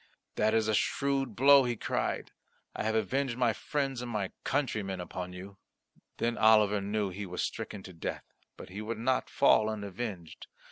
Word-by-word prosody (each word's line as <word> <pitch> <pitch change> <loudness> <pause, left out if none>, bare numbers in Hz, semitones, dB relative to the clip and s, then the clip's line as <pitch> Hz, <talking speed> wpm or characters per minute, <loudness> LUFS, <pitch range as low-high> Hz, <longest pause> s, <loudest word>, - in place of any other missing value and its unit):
"That 110 +1 +2
is 110 -1 +2
a 110 - +1
shrewd 135 +2 0
blow," 140 +3 +7
he 120 -1 -1
cried; - - -2 0.4
"I - - -3
have 110 +1 0
avenged 125 +3 0
my 120 -3 +3
friends 135 +1 -2
and 105 -6 -3
countrymen 110 -9 -1
upon 90 0 -5
you." 95 +2 -10 0.6
Then 120 0 -1
Oliver 105 -2 +5
knew 100 0 -1
he 100 +2 -6
was 90 0 -3
stricken 105 -3 -5
to 95 - -10
death, 80 - -5 0.3
but - - -10
he 100 +3 -6
would 110 +1 -4
not 125 +3 0
fall 110 -6 +4
unavenged. 100 -4 -6
110 Hz, 170 wpm, -30 LUFS, 100-125 Hz, 0.6 s, blow